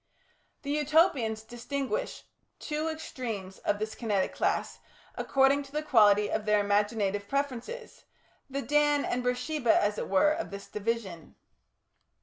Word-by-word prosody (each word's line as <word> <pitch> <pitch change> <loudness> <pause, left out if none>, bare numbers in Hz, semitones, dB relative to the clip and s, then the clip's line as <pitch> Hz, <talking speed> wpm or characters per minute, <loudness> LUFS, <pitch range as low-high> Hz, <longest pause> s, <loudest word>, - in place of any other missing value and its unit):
The 285 - -3
Utopians 295 -7 +2
distinguished 240 +1 -4 0.3
two 305 +1 -3
extremes 230 -11 -5
of 205 - 0
this 215 +1 -4
Kinetic 205 -5 -1
class - - -1 0.3
according 275 +1 +3
to 275 -1 -12
the 300 +1 -2
quality 210 -7 +5
of 215 +1 -2
their 210 0 +3
imaginative 205 0 0
preferences, 280 - -4 0.4
the 275 +1 -3
Dan 295 +2 +2
and 250 - -1
Beersheba, 250 +1 +1
as 205 +1 0
it - - -4
were, 200 +11 +4
of 325 +2 -3
this 200 0 -8
division. 210 -6 -4
240 Hz, 130 wpm, -29 LUFS, 210-285 Hz, 0.4 s, quality